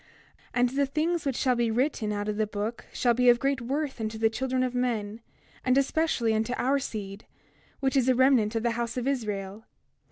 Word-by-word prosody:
28:2 - - -29 0.5
And 245 0 +3
the 280 +2 +1
things 315 +4 -1
which 270 - 0
shall 255 0 +2
be 235 -1 +1
written 230 -2 0
out 205 0 -3
of 210 -1 -2
the 215 -1 +1
book 210 +3 -4
shall 240 -1 +2
be 250 +1 +4
of 240 - +6
great 275 0 0
worth 270 +1 -3
unto 220 0 -3
the 225 0 +2
children 255 +2 -1
of 250 -1 -1
men, 230 -3 -2 0.4
and 255 +1 +3
especially 275 -5 +1
unto 220 +2 0
our 275 +3 +2
seed, 205 -5 -6 0.6
which 270 -1 +1
is 260 -1 +3
a 255 - +4
remnant 250 -4 +3
of 225 - 0
the 235 - +2
house 235 +1 -3
of 250 +1 -2
Israel. 210 -5 -3
240 Hz, 215 wpm, -27 LUFS, 220-265 Hz, 0.6 s, of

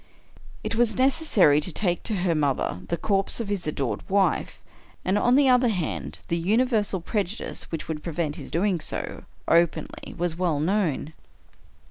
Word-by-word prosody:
It - - -2
was 225 -1 +1
necessary 255 - +4
to 180 - -2
take 175 -1 0
to 215 - 0
her 180 -2 +1
mother 140 - 0
the 170 - -1
corpse 195 +4 +1
of 225 -4 -3
his 195 -5 -2
adored 140 -5 -2
wife, 195 0 +1 0.5
and, 185 - +2
on 245 +4 +3
the 280 0 +5
other 250 -1 +5
hand, 85 - -3
the 170 - 0
universal 210 0 +1
prejudice 205 +3 -4
which 165 - -4
would 155 -1 -4
prevent 160 -2 -2
his - - -8
do 170 - 0
ing 195 -5 +1
so - - -5 0.2
openly 170 -1 +1
was 175 -1 -1
well 170 -5 +1
known. 160 -3 0
180 Hz, 165 wpm, -25 LUFS, 160-215 Hz, 0.5 s, the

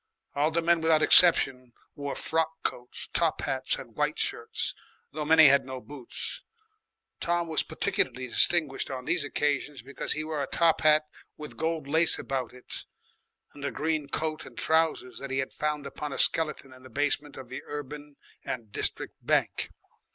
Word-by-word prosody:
All 145 +2 +2
the 165 +1 0
men 170 0 +3
without 160 -1 +4
exception 130 -8 +5 0.2
wore 140 -1 -5
frock 160 0 -1
coats, 125 0 -4
top - - +1
hats, - - 0
and - - -10
white - - 0
shirts, - - -2 0.4
though 150 0 -4
many 160 0 +8
had 140 +1 +5
no 130 0 -6
boots. 140 - -6 0.8
Tom 175 0 0
was 160 -2 +1
particularly 130 0 0
distinguished 145 +3 +2
on 130 -1 -5
these 170 -4 +1
occasions 145 -2 -1
because 140 +2 -3
he 155 - -3
wore 155 -2 -3
a 140 - -2
top 165 -1 +3
hat 155 0 +5 0.3
with 150 -1 -9
gold 160 -2 -2
lace 160 +3 +4
about 130 -3 -3
it 125 0 -8 0.7
and 145 - -11
a 140 - 0
green 155 -1 -1
coat 155 +2 -2
and - - -13
trousers 160 -6 +1
that 140 - -6
he 135 - -2
had 135 0 -2
found 150 -1 -2
upon 145 +1 -5
a - - -5
skeleton 150 -4 +1
in 130 - -16
the 130 - -13
basement 145 +2 -1
of 130 -2 -9
the 130 - -6
Urban 145 0 -7 0.3
and 110 -4 -5
District - - -2
Bank. - - +1
145 Hz, 175 wpm, -28 LUFS, 135-160 Hz, 0.8 s, many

